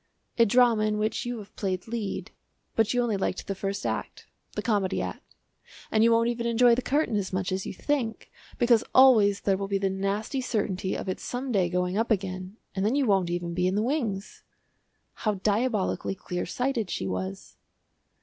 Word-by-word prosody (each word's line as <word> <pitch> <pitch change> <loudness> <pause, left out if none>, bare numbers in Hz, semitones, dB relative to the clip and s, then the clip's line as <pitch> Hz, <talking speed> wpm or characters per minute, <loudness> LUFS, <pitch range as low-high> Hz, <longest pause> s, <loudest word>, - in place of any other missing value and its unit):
"A 230 - +6
drama 235 -1 +4
in 210 0 0
which 215 +3 -1
you 245 0 -3
have 205 -2 -11
played 185 -2 -2
lead. 225 -3 -4 0.4
But 225 -1 +3
you 245 0 +2
only 220 -4 0
liked 190 -1 -2
the 195 - -2
first 195 +1 -4
act - - -3 0.3
the - - -2
Comedy 205 -4 +1
Act, - - -6 0.6
and 215 0 +4
you 230 - +5
won't 230 0 +4
even 235 0 -1
enjoy 235 +1 +5
the 245 - +1
curtain 280 -3 +1
as 195 -2 -2
much 185 0 -1
as 190 0 -2
you - - -4
think, 250 -5 -2 0.3
because 235 -2 +4
always 220 -7 +6
there 195 -1 +2
will 195 0 -3
be 200 0 0
the 195 0 0
nasty 200 +7 -2
certainty 200 -6 -1
of - - -5
its 185 - -3
some 255 +1 -3
day 190 -5 +2
going 180 +2 0
up 230 - 0
again, 185 -1 -2 0.2
and 190 - -2
then 220 +6 +2
you 285 -2 +2
won't 195 -5 +2
even 175 0 -2
be 180 +1 +1
in 185 - 0
the 210 - +1
wings." 225 -7 -2 0.8
How 215 -2 +1
diabolically 210 0 0
clear 180 -2 -4
sighted 245 0 -1
she - - -3
was! 95 0 -5
210 Hz, 200 wpm, -27 LUFS, 190-235 Hz, 0.8 s, A